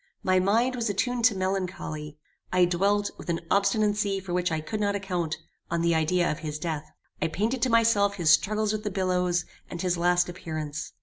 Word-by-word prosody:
My 185 Hz, 0 st, +3 dB
mind 230 Hz, +7 st, +2 dB
was 235 Hz, -2 st, -1 dB
attuned 240 Hz, +4 st, 0 dB
to 225 Hz, -3 st, +5 dB
melancholy. 185 Hz, -5 st, -3 dB, 0.3 s
I 180 Hz, -1 st, +5 dB
dwelt, 200 Hz, +4 st, +1 dB
with -, -, -9 dB
an 165 Hz, -1 st, 0 dB
obstinacy 205 Hz, 0 st, +2 dB
for 185 Hz, -2 st, -6 dB
which 180 Hz, 0 st, 0 dB
I 160 Hz, -, 0 dB
could 185 Hz, +8 st, -4 dB
not 200 Hz, -1 st, +1 dB
account, 180 Hz, -5 st, -2 dB, 0.3 s
on 170 Hz, 0 st, 0 dB
the 170 Hz, 0 st, +3 dB
idea 170 Hz, +2 st, +2 dB
of 155 Hz, -, -4 dB
his 150 Hz, -1 st, -4 dB
death. 155 Hz, -1 st, -4 dB, 0.3 s
I -, -, +2 dB
painted 220 Hz, +10 st, -1 dB
to 255 Hz, -, +2 dB
myself 225 Hz, -3 st, +3 dB
his 170 Hz, -5 st, +3 dB
struggles 215 Hz, +1 st, +3 dB
with 215 Hz, 0 st, -3 dB
the 210 Hz, -, -1 dB
billows, 180 Hz, -2 st, 0 dB, 0.2 s
and 175 Hz, -, -6 dB
his 175 Hz, -1 st, 0 dB
last 175 Hz, +1 st, +3 dB
appearance. 155 Hz, -4 st, -5 dB
185 Hz, 195 wpm, -27 LUFS, 170-205 Hz, 0.3 s, to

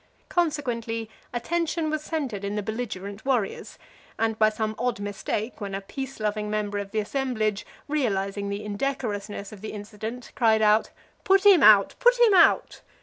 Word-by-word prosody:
Consequently, 240 Hz, -9 st, -1 dB, 0.2 s
attention 325 Hz, +5 st, -1 dB
was 310 Hz, -1 st, -1 dB
centred 275 Hz, -11 st, -3 dB
in 200 Hz, +1 st, -3 dB
the 210 Hz, -, -2 dB
belligerent 210 Hz, -2 st, -5 dB
warriors, 245 Hz, -7 st, -1 dB, 0.4 s
and, 225 Hz, -1 st, 0 dB
by 215 Hz, 0 st, +6 dB
some 215 Hz, 0 st, -2 dB
odd 245 Hz, -2 st, -1 dB
mistake, 205 Hz, +3 st, -4 dB
when 200 Hz, -1 st, -4 dB
a 195 Hz, -, -4 dB
peace 265 Hz, +6 st, -7 dB
loving 210 Hz, 0 st, -2 dB
member 210 Hz, -1 st, -2 dB
of 200 Hz, -1 st, -5 dB
the 220 Hz, -, -5 dB
assemblage, 215 Hz, -2 st, -1 dB, 0.2 s
realizing 200 Hz, -8 st, -1 dB
the 200 Hz, +1 st, -4 dB
indecorousness 205 Hz, -3 st, -3 dB
of 210 Hz, -3 st, -11 dB
the 215 Hz, -, -6 dB
incident, 215 Hz, +3 st, -7 dB
cried 220 Hz, -3 st, +3 dB
out, 215 Hz, +1 st, +4 dB, 0.3 s
"Put 390 Hz, +1 st, +3 dB
him 390 Hz, -6 st, +8 dB
out! 210 Hz, -4 st, +7 dB
put -, -, +4 dB
him 470 Hz, -4 st, +6 dB
out!" 360 Hz, -, +4 dB
220 Hz, 160 wpm, -26 LUFS, 205-270 Hz, 0.4 s, him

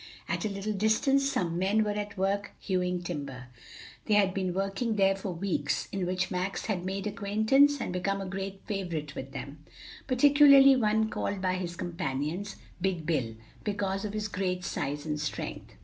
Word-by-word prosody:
At -, -, -2 dB
a -, -, 0 dB
little 200 Hz, +2 st, -3 dB
distance 245 Hz, +7 st, +2 dB
some 175 Hz, -7 st, -1 dB
men 200 Hz, +4 st, +3 dB
were 210 Hz, -, -1 dB
at 205 Hz, 0 st, -4 dB
work 200 Hz, +2 st, -1 dB
hewing 180 Hz, -2 st, -1 dB
timber. 140 Hz, -7 st, -6 dB, 0.6 s
They 210 Hz, -, +3 dB
had 195 Hz, -2 st, +4 dB
been 185 Hz, -1 st, -1 dB
working 195 Hz, +5 st, -1 dB
there 195 Hz, -1 st, +4 dB
for 195 Hz, 0 st, -4 dB
weeks, 170 Hz, -5 st, -1 dB
in 190 Hz, -3 st, -2 dB
which 185 Hz, 0 st, -1 dB
Max 185 Hz, +1 st, -2 dB
had 190 Hz, -5 st, -1 dB
made 195 Hz, +2 st, -3 dB
acquaintance 220 Hz, +8 st, +3 dB
and 180 Hz, -, -3 dB
become 195 Hz, +2 st, -1 dB
a 195 Hz, -, -4 dB
great 195 Hz, +1 st, -5 dB
favorite 170 Hz, -8 st, -3 dB
with 135 Hz, -1 st, -7 dB
them, 140 Hz, +2 st, -8 dB, 0.4 s
particularly 275 Hz, +1 st, +7 dB
one 220 Hz, -2 st, +2 dB
called 200 Hz, -1 st, -2 dB
by 185 Hz, -1 st, 0 dB
his 180 Hz, -2 st, -3 dB
companions, 170 Hz, +2 st, -3 dB, 0.3 s
"Big 180 Hz, -4 st, -1 dB
Bill," 130 Hz, -9 st, -1 dB, 0.3 s
because 195 Hz, -2 st, -1 dB
of 210 Hz, -1 st, -4 dB
his 215 Hz, 0 st, -2 dB
great 185 Hz, -2 st, -2 dB
size 145 Hz, +1 st, -3 dB
and 150 Hz, -1 st, -2 dB
strength. 150 Hz, -, -5 dB
195 Hz, 175 wpm, -29 LUFS, 175-210 Hz, 0.6 s, particularly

